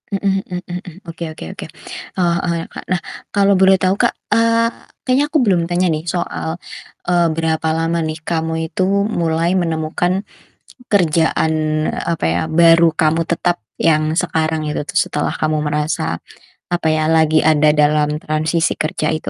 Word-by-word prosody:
Mhm 195 -1 0
mhm 180 -1 -5
mhm 175 0 -4
mhm. 175 -2 -11
Oke 165 0 -7
oke 155 - -9
oke. - - -7 0.5
Heeh 170 -1 +2
heeh, 175 - 0
ya, 165 - -5
Kak. - - -9
Nah 185 - +1 0.3
kalau 200 -1 +3
boleh 190 0 +5
tau, 185 +1 +2
Kak, - - +2 0.2
eee, 230 0 +3 0.4
kayaknya 260 +3 +3
aku 315 - +3
belum 195 -9 +3
tanya 180 +1 +2
nih 155 -2 -1
soal, 170 -1 -3 0.5
eee, 175 -1 +3
berapa 160 0 -1
lama 165 +1 0
nih 155 0 -4
kamu 160 0 -2
itu 165 +4 -2 0.2
mulai 170 -3 0
menemukan, 175 +3 -1 0.7
kerjaan, 160 -3 +2 0.4
apa 165 - -2
ya, 85 +2 0
baru 165 0 +5
kamu 160 +1 +1
tetap 175 +1 0 0.2
yang 155 -1 +2
sekarang 160 -2 0
itu 150 -1 -3
tuh - - -4
setelah - - -1
kamu 155 0 -1
merasa, 150 - -1 0.5
apa 175 -2 0
ya, 155 0 +1
lagi 160 -1 +3
ada 155 -1 +4
dalam 150 0 +2
transisi 155 +2 0
kerja 155 0 -2
itu? 155 - -4
165 Hz, 160 wpm, -18 LUFS, 155-180 Hz, 0.7 s, boleh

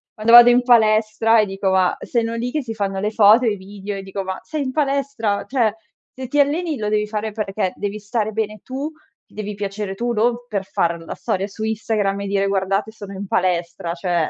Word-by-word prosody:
quando 220 +1 +1
vado 240 0 +11
in 245 +1 +4
palestra, 220 -1 +4
e - - +1
dico 195 0 -2
ma 185 -1 +2
sono 230 -1 -1
lì 235 +2 -2
che 300 0 -2
si 225 -2 -5
fanno 195 -2 -2
le 210 +2 -1
foto 220 +3 +6
e 225 - +3
i 205 - -2
video, 200 +1 -7
e - - -5
dico 195 0 -5
"Ma 190 0 -5
sei 310 -2 -4
in 260 - -3
palestra! 275 -7 -1
Cioè, 235 -5 +1 0.4
se 260 0 -7
ti 290 +4 0
alleni, 305 +2 +1
lo 210 -2 -2
devi 210 0 +1
fare 215 0 -3
perché 205 -3 -2
devi 205 +1 -4
stare 215 +1 -2
bene 215 0 -3
tu, 275 +4 -5 0.3
ti - - -27
devi 210 -1 -5
piacere 200 -1 -4
tu, 240 +3 -2
non 235 +2 +2
per 200 -4 -3
far 170 -2 -1
la 165 - -7
storia 195 +2 -2
su 215 +2 -8
Instagram, 215 -2 -1
e 200 - -4
dire: 195 0 +1
'Guardate, 195 +2 0
sono 205 -2 -10
in 195 +1 -6
palestra'." 170 -2 -1
Cioè, 175 -3 -1
210 Hz, 225 wpm, -20 LUFS, 195-235 Hz, 0.4 s, vado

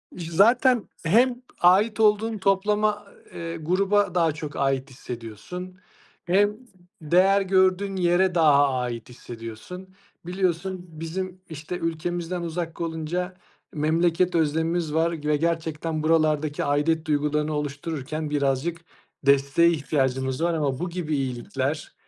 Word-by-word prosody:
İş 170 -2 -6
zaten 240 +5 +4 0.2
hem 245 +7 +3 0.2
ait 205 +5 +4
olduğun 215 +1 +3
toplama 205 +2 +1 0.3
eee, 165 0 -5
gruba 190 +3 +1
daha 165 -3 +3
çok 150 -1 -7
ait 135 0 0
hissediyorsun, 130 - -8 0.5
hem 205 +4 +2 0.4
değer 185 +6 +4
gördüğün 190 +1 +2
yere 180 0 +2
daha 145 -4 +5
ait 120 -2 -3
hissediyorsun. 120 - -9 0.3
Biliyorsun, 180 0 -2
bizim, 180 +4 -6
işte, 160 +3 -6
ülkemizden 170 +2 -3
uzak 170 0 -4
olunca, 170 +3 -3 0.4
memleket 170 +4 +1
özlemimiz 160 0 0
var 165 +1 +2
ve 150 0 +2
gerçekten, 160 -1 -2
buralardaki 155 -2 +1
aidiyet 155 +3 +1
duygularını 150 +1 0
oluştururken 150 +1 -4
birazcık 145 +4 -1 0.4
desteğe 140 +4 +4
ihtiyacımız 130 -2 -1
var. 170 - +2
Ama 140 -5 -1
bu 180 0 -2
gibi 165 -4 -3
iyilikler, 135 +3 -3
165 Hz, 115 wpm, -25 LUFS, 150-185 Hz, 0.5 s, daha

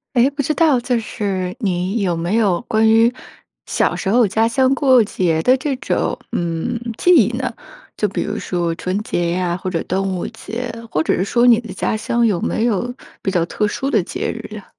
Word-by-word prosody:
哎， 245 +3 +4
不 285 0 -2
知 305 - 0
道 305 -6 +4
就 245 +1 0
是 190 -4 -3
你 190 -1 -1
有 180 -3 0
没 170 +6 -1
有 200 -6 +2
关 220 -1 +3
于， 225 +2 +5 0.5
小 - - 0
时 - - -3
候 230 +1 +4
家 220 +3 +2
乡 260 +3 +2
过 260 -3 +5
节 170 -6 0
的 255 +7 +4
这 275 +1 -2
种， - - -1
嗯， 170 +8 -2 0.2
记 355 - +2
忆 235 -3 +3
呢？ 260 0 -2 0.4
就 210 - +1
比 200 - -3
如 205 +1 -3
说 175 -2 -2
春 185 +2 -2
节 175 -5 -1
呀 175 -1 -1
或 185 - -5
者 175 -3 -1
端 190 +2 -1
午 190 -2 -2
节， 235 +3 -6 0.2
或 155 - 0
者 - - +1
是 185 - 0
说 240 +4 +2
你 235 -2 +7
的 235 - -9
家 - - -1
乡 235 +2 0
有 205 -7 +2
没 - - -1
有 240 +2 -1 0.3
比 190 - -1
较 175 -3 +2
特 210 - -1
殊 265 +6 -2
的 220 - +3
节 - - -3
日 225 -2 -7
呀？ 205 -2 -8
215 Hz, 230 characters per minute, -19 LUFS, 185-240 Hz, 0.5 s, 你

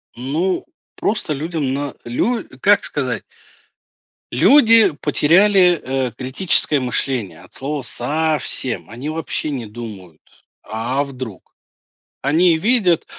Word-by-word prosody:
Ну, 155 +10 -1 0.3
просто 210 -7 -1
людям 150 -2 -2
на 140 -1 -3
лю 225 - -1 0.2
как - - +4
сказать - - -3 1.1
люди 225 - +6
потеряли, 180 +4 +4 0.3
э, 120 - -7
критическое 140 +2 +1
мышление 125 -4 -2
от - - -18
слова 140 +1 -4
совсем, 130 - -2
они 125 +7 -6
вообще 155 -1 -3
не 125 -6 -4
думают, 105 -8 -10 0.4
а 120 +6 -2
вдруг, 130 -7 -9 0.7
они 160 +4 +3
видят, 195 -3 +2
145 Hz, 105 wpm, -19 LUFS, 125-175 Hz, 1.1 s, люди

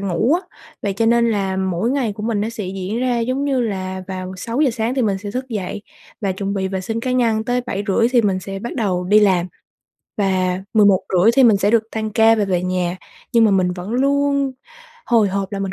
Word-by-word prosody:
ngủ 200 - +1
á. 355 - 0 0.4
Vậy 200 - -1
cho 225 +4 0
nên 235 0 +3
là 195 -3 -1
mỗi 190 +4 -1
ngày 260 -6 0
của 210 - -8
mình 220 -2 -1
nó 215 - -1
sẽ 225 -3 -6
diễn 190 +3 -4
ra 250 -1 +1
giống 255 +4 -1
như 275 -3 +1
là 190 -4 -3
vào 185 -1 -5
6:00 250 +8 0
sáng 230 +1 -2
thì 265 - +1
mình 200 -4 0
sẽ 205 +1 -6
thức 255 +3 -4
dậy 205 -3 -4 0.4
và 200 -3 0
chuẩn 195 +1 -3
bị 190 -1 -1
vệ 190 0 -3
sinh 225 +5 -3
cá 250 +2 -2
nhân, 230 -3 +1
tới 245 +1 0
7:30 205 -1 0
thì 240 - +4
mình 195 -3 +1
sẽ 195 +1 -6
bắt 235 +4 -6
đầu 190 -7 -1
đi 205 +4 +5
làm, 185 -4 +3 0.7
và 185 -2 0 0.2
11:30 200 -1 +4
thì 270 - +5
mình 220 -4 +6
sẽ 200 +1 +1
được 230 -1 +4
tan 220 -1 -3
ca 225 +1 +5
và 215 - +1
về 180 -2 0
nhà. 180 -1 -1 0.4
Nhưng 230 -2 +5
mà 215 - +4
mình 185 -2 +2
vẫn 180 +3 -7
luôn 280 +1 +1 0.5
hồi 225 -4 +3
hộp 195 +1 -3
là 200 - -3
mình 195 -1 -3
210 Hz, 235 wpm, -19 LUFS, 190-235 Hz, 0.7 s, mình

